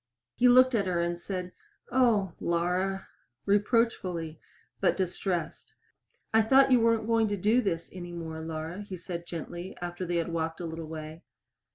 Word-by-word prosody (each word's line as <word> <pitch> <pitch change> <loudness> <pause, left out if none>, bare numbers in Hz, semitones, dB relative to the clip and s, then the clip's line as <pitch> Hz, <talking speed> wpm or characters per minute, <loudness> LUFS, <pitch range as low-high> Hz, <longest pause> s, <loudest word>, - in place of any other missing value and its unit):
He 250 - +4
looked 255 +1 +6
at 200 -4 +1
her 180 -2 0
and 170 0 -1
said, 180 0 -4 0.4
"O, 225 -8 +3
Laura!" 180 +3 0 0.4
reproachfully, 200 -6 +1 0.4
but - - +2
distressed. 180 -2 -3 0.6
"I 225 - +6
thought 265 +5 +5
you 250 - +6
weren't 230 -1 +2
going 225 -1 +3
to 205 0 -1
do 215 +6 +3
this 170 -7 -2
any 175 -1 -7
more, 160 -2 -6
Laura," 160 +3 -5
he 200 -2 -7
said 170 -1 -6
gently, 175 +2 -6
after 175 +1 -5
they 175 - -1
had 170 0 0
walked 165 0 -2
a 175 - -4
little 165 -1 -6
way. 155 +1 -7
180 Hz, 165 wpm, -29 LUFS, 170-215 Hz, 0.6 s, looked